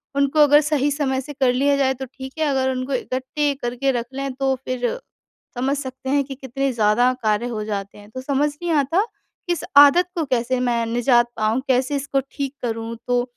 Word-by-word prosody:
उनको 280 +2 +1
अगर 295 +1 +6
सही 290 -2 +1
समय 270 -2 -1
से 290 +3 -9
कर 260 -3 +2
लिया 280 +2 +2
जाए 265 -1 +2
तो 265 0 -6
ठीक 265 +1 -10
है, 310 - +2
अगर 265 -1 +1
उनको 255 +1 -3
इकट्ठे 260 +3 -1
करके 250 +3 0
रख 240 -1 -2
लें, 275 0 -3
तो 270 0 0
फिर 250 -1 -1 0.7
समझ 270 +3 0
सकते 265 -1 -6
हैं 280 0 +2
कि 270 0 -8
कितने 270 +1 -2
ज़्यादा 230 +3 +3
कार्य 215 +2 +1
हो 215 - -3
जाते 200 -2 -5
हैं। 205 0 -14
तो 255 - -6
समझ 280 +2 +1
नहीं 345 -1 -1
आता, 320 +7 +2 0.4
इस 345 - 0
आदत 290 +5 +8
को 330 - 0
कैसे 255 -1 0
मैं 235 -2 0
निजात 240 +1 +3
पाऊँ, 220 +4 +1
कैसे 260 +2 +1
इसको 275 0 0
ठीक 280 0 -4
करूँ। 225 0 -3
तो 245 0 +2
265 Hz, 200 wpm, -22 LUFS, 245-280 Hz, 0.7 s, आदत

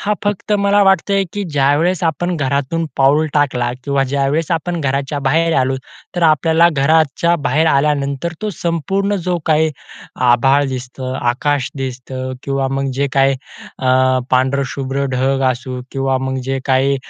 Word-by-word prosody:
हा 210 - 0
फक्त 205 +1 -1
मला 200 0 +3
वाटतं 195 +1 +3
आहे 195 0 +2
की 205 - -3
ज्यावेळेस 150 +3 +1
आपण 175 +2 0
घरातून 145 +3 -1
पाऊल 140 +3 +3
टाकला 130 -5 +1
किंवा 140 -1 +1
ज्यावेळेस 140 +4 0
आपण 170 +1 -1
घराच्या 140 0 -1
बाहेर 165 +4 +2
आलो. 130 0 +1 0.4
तर 175 - 0
आपल्याला 160 +1 +4
घराच्या 160 +2 +2
बाहेर 150 +6 +2
आल्यानंतर, 140 +1 +1
तो 215 - -1
संपूर्ण 195 +4 -1
जो 180 -1 +1
काही 155 0 +3 0.6
आभाळ 135 +4 +4
दिसतो, 130 0 -5
आकाश 130 +3 0
दिसतं 130 0 -5
किंवा 135 -1 -1
मग 135 0 -2
जे 140 +2 0
काही 135 0 +3 0.4
अ, 130 0 +3
पांढरं 130 +2 +2
शुभ्र 135 +1 -3
ढग 135 +1 +1
असू 125 0 -5
किंवा 135 -1 0
मग 130 0 -3
जे 135 0 0
काही 135 +1 +2
140 Hz, 150 wpm, -17 LUFS, 130-165 Hz, 0.6 s, आपल्याला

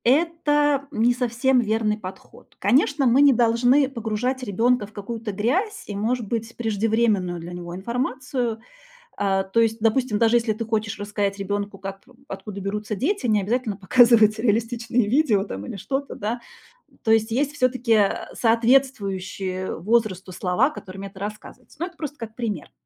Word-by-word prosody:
Это 295 0 +2
не 240 -1 +3
совсем 250 +1 +1
верный 220 -2 0
подход. 190 -2 -11
Конечно, 275 +6 +3
мы 250 +3 +5
не 285 -1 +7
должны 245 +4 +3
погружать 245 +1 -2
ребёнка 235 0 +1
в 210 - -20
какую-то 220 +1 -5
грязь 330 - -1
и, 205 - -6
может 225 +2 -1
быть, 230 +1 -3
преждевременную 215 -5 +1
для 170 +2 -8
него 175 0 -7
информацию. 245 +2 -2 0.6
А, 195 -1 +1
то 190 +4 0
есть, 225 0 +2
допустим, 225 -1 +1
даже 230 +1 +4
если 230 -2 0
ты 230 +2 -5
хочешь 215 -2 -2
рассказать 205 -1 -2
ребёнку, 200 0 -3
как 195 0 -7
п 255 - -20
откуда 205 -8 -7
берутся 210 +2 -3
дети, 290 - -1
не 210 -2 +3
обязательно 220 +1 -1
показывать 220 +1 +5
реалистичные 230 +1 0
видео 235 -7 +3
там 100 - -6
или 200 - -6
что-то, 275 +7 -3
да. 225 +4 -3 0.6
То - - -2
есть 220 0 +3
есть 280 +5 0
всё-таки, 255 -3 +1
э, 205 -3 +5 0.2
соответствующие 205 -6 +1
возрасту 205 -3 0
слова, 185 +8 +1
которыми 195 -9 -8
это 195 -1 -13
рассказывается. 210 +7 -8
Но 345 - -1
это 350 -2 -15
просто 295 -2 -6
как 225 -3 -8
пример. 215 -9 -4
225 Hz, 160 wpm, -23 LUFS, 205-250 Hz, 0.6 s, не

